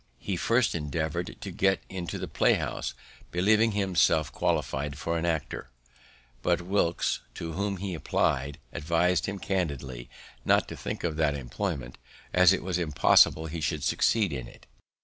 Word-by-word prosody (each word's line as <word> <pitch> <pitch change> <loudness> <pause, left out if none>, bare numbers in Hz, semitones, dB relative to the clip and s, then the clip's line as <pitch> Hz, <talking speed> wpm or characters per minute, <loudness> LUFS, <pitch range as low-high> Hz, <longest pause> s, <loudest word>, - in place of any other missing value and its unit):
He 100 - -3
first 115 +7 +2
endeavoured 80 0 -3
to - - -5
get 95 -1 +1
into 90 -3 -5
the - - -4
play - - +3
house, - - -3 0.3
believing 105 +5 +3
himself 90 -7 +2
qualify'd 70 +2 -1
for 85 +2 -2
an 85 +1 -1
actor; 80 -4 -2 0.7
but - - +2
Wilkes, 90 -2 +1 0.2
to 80 - -5
whom 100 +2 -1
he 95 0 -4
apply'd, 70 -3 0 0.2
advis'd 85 +4 +1
him 100 0 -3
candidly 70 -11 -3 0.3
not - - +3
to - - -6
think - - -5
of 80 -3 -1
that 75 -3 +2
employment, 65 -1 -4 0.3
as 90 0 +7
it 95 - 0
was 90 -1 -1
impossible 80 0 +4
he 80 +1 -5
should 75 -1 -1
succeed 105 -8 +2
in 65 -3 -5
it. - - -16
85 Hz, 155 wpm, -28 LUFS, 75-95 Hz, 0.7 s, as